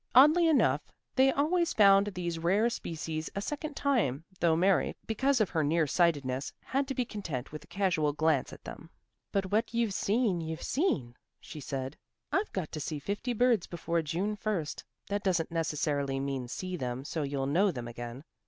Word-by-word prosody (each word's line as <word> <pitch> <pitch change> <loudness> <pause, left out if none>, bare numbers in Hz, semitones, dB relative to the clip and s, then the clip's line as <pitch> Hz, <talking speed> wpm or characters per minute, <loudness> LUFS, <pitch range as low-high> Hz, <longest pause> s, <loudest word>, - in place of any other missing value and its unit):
Oddly 305 +6 +7
enough 180 - +4 0.3
they 265 +1 +5
always 335 +5 +1
found 200 -1 +6
these 175 -4 -3
rare 200 +8 +2
species 160 -4 -4
a - - 0
second 295 +5 -4
time, 215 - +1 0.2
though 165 -1 +4
Mary, 185 +3 +2
because 265 +4 +1
of 215 - +1
her 160 -2 +1
near 160 +2 +2
sightedness, 140 -5 +1
had 270 +1 -1
to 270 - -3
be 250 - 0
content 165 - -5
with 150 -1 -7
a - - -29
casual 170 -4 +1
glance 150 -2 +1
at - - -12
them. - - -9 0.4
"But 195 -1 -1
what 225 +3 +1
you've 230 -4 +1
seen, 205 -3 +1
you've 160 0 -5
seen," 140 - 0 0.2
she 155 - -9
said. 135 0 -4 0.3
"I've 405 +3 0
got 180 -5 -3
to 155 - -4
see 155 +1 -3
fifty 205 - -3
birds 235 -4 +3
before 170 0 -1
June 175 +7 -2
1st; 200 -7 -3 0.2
that 205 0 -1
doesn't 175 -5 0
necessarily 145 -4 -1
mean 135 -2 -3
see 185 +8 -4
them 125 -1 -4
so 160 - -3
you'll 140 -1 -1
know 175 +9 +3
them 125 -8 -4
again. 120 +3 -7
170 Hz, 180 wpm, -30 LUFS, 145-215 Hz, 0.4 s, Oddly